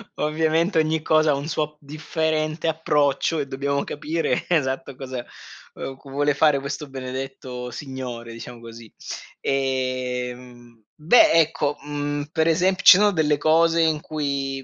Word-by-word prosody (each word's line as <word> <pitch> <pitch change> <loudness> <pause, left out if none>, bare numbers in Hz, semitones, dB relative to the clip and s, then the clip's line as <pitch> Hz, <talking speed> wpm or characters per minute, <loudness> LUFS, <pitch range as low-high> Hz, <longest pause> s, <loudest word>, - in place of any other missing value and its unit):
ovviamente 160 +3 +1
ogni 155 0 +1
cosa 155 0 +3
ha - - +2
un 140 +1 -4
suo 150 -1 -2
differente 155 +2 -2
approccio 155 0 +1
e 140 - -2
dobbiamo 140 +1 -1
capire 160 +3 -2
esatto, 135 -4 -1
cosa 130 -2 -6
c 135 0 -11
vuole 145 +2 +1
fare 145 0 +3
questo 140 +2 -5
benedetto 130 -1 -6
signore 125 -2 -7
diciamo 120 +1 -9
così 115 -1 -12 0.5
ehm, 125 -3 -3
beh 245 - +5
ecco 155 -3 +2
,mhmm, 145 0 -3
per 160 -1 +1
ese 180 +4 +3
ci - - +9
sono 210 +1 +4
delle 155 -5 +1
cose 165 +2 +3
in 160 -2 +2
cui 140 -3 -3
145 Hz, 135 wpm, -23 LUFS, 130-155 Hz, 0.5 s, ci